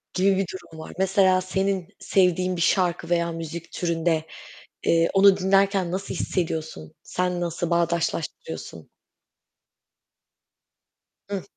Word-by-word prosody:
gibi 195 +1 +3
bir 195 - +1
durum 170 -3 -10
var. 160 - -8
Mesela 190 -1 +3
senin 190 -1 -1
sevdiğin 185 -1 +2
bir 170 - -3
şarkı 175 -2 +1
veya 170 -1 +1
müzik 165 0 -7
türünde, 165 -2 0 0.6
eee, 165 0 +3
onu 195 0 +6
dinlerken 195 -1 +2
nasıl 195 +2 -3
hissediyorsun? 160 - -3
Sen 180 -1 -2
nasıl 170 0 -2
bağdaşlaştırıyorsun? 170 - -2 2.4
Hıh. 200 -2 -3
180 Hz, 110 wpm, -24 LUFS, 170-190 Hz, 2.4 s, onu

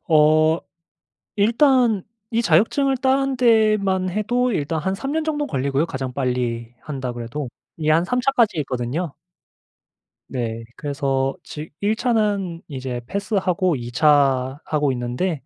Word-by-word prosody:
어 155 0 +5 0.8
일단 235 -1 +3 0.3
이 230 +1 +1
자격증을 235 - +3
따는 270 0 +1
데만 215 -6 +3
해도 240 +5 0
일단 155 -2 -1
한 190 +5 -1
3 270 +8 -4
년 320 0 0
정도 295 -2 -1
걸리고요 140 +3 0
가장 130 -4 -4
빨리 125 -3 -2
한다 130 -4 -5
그래도. 120 +3 -5 0.3
이게 155 -1 0
한 165 +3 +4
3 250 +6 0
차까지 235 -8 +2
있거든요. 135 +5 -3 1.2
네. 115 -3 -3
그래서 135 -2 -1
지 150 +1 -8
1 210 +2 +1
차는 210 -8 0
이제 130 -3 -4
패스하고 185 -3 0
2 120 0 -6
차 135 -1 +3
하고 145 -3 +1
있는데 125 +5 -2
160 Hz, 240 characters per minute, -22 LUFS, 135-215 Hz, 1.2 s, 어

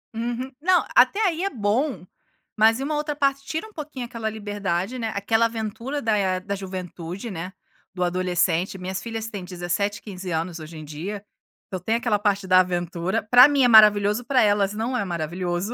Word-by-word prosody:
Uhum. 240 +3 -3
Não, 365 +1 +3
até 420 +1 +5
aí 345 0 0
é 395 - +1
bom, 215 - -1 0.5
mas 225 +2 +4
e - - -3
uma 300 +1 -2
outra 295 0 -2
parte 275 -1 +1
tira 320 +9 -4
um 430 - -18
pouquinho 290 -5 -6
aquela 230 -2 -4
liberdade, 205 +1 -3
né, 225 -1 -2
aquela 225 +3 +2
aventura 230 +5 -4
da, 220 -2 +2
eh, 185 -2 0
da 200 +2 -5
juventude, 185 +1 -6
né, 180 +2 -6 0.4
do 180 - -1
adolescente, 180 0 0
minhas 185 +1 -5
filhas 225 -1 -5
têm 200 -3 -6
17 180 +3 -2
e - - -33
15 190 -3 -7
anos 165 +1 -2
hoje 155 +1 -9
em 155 - -8
dia, 185 +8 -6 0.4
então 185 - -5
tem 220 +6 -1
aquela 230 -3 +1
parte 200 -2 0
da 185 0 +5
aventura, 175 0 -1
para 245 +5 +8
mim 285 -2 +2
é - - +6
maravilhoso, 210 0 +6
para 255 -1 +3
elas 205 -1 +2
não 230 +4 -2
é 200 - 0
maravilhoso. 175 +4 -3
205 Hz, 195 wpm, -24 LUFS, 185-240 Hz, 0.5 s, para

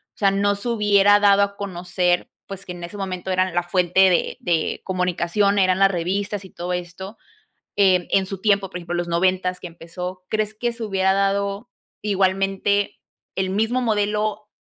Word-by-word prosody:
o - - -45
sea, 195 -2 +3
no 200 +1 +1
se 200 +4 -5
hubiera 205 -2 +4
dado 200 -1 +5
a 200 0 -3
conocer, 180 -2 -1 0.2
pues, 195 0 -8
que 180 - -6
en 175 -1 -9
ese 175 +4 -8
momento 190 -1 -4
eran 185 -1 +1
la 175 - +2
fuente 180 +1 +3
de 175 - 0
de 165 -2 -1
comunicación 185 +2 0
eran 185 0 +3
las 195 0 +5
revistas 195 +3 -2
y - - -12
todo 175 +1 -5
esto, 180 +4 -6 0.6
eh, 185 -3 +3
en 195 -1 +3
su 195 -1 -5
tiempo, 200 -2 +1
por 180 - -6
ejemplo, 175 0 -5
los 175 0 -2
noventas 180 +1 +1
que 180 - -7
empezó, 180 +2 -8
¿crees 215 0 -1
que 240 +2 -2
se 230 -1 -7
hubiera 190 -2 +1
dado 200 +3 -1 0.3
igualmente 195 0 +1 0.4
el 190 -1 -1
mismo 225 +5 0
modelo, 210 -1 -1
195 Hz, 180 wpm, -22 LUFS, 180-205 Hz, 0.6 s, dado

